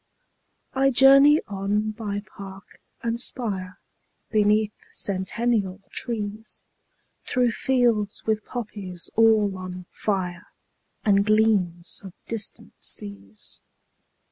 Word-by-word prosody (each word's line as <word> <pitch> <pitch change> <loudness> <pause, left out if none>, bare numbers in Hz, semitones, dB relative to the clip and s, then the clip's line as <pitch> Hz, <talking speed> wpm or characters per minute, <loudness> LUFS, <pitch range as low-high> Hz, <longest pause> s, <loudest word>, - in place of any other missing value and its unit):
20 270 0 +3
I - - +5
journey 275 +3 +7
on 205 +2 -1
by 205 -2 -4
park 195 0 -12 0.2
and 230 0 -1
spire, 195 -8 -1 0.5
Beneath 210 0 +3 0.2
centennial 200 0 0
trees, 220 -2 -5 0.6
Through 250 -2 +1
fields 235 -6 +1
with 220 -1 0
poppies 200 -7 -6
all 220 -3 +4
on 180 -1 -7
fire, 185 -4 -3 0.6
And 200 -2 +4
gleams 200 -5 +1
of 190 -3 -9
distant 220 -3 -4
seas. 100 0 -5
210 Hz, 95 wpm, -24 LUFS, 190-230 Hz, 0.6 s, journey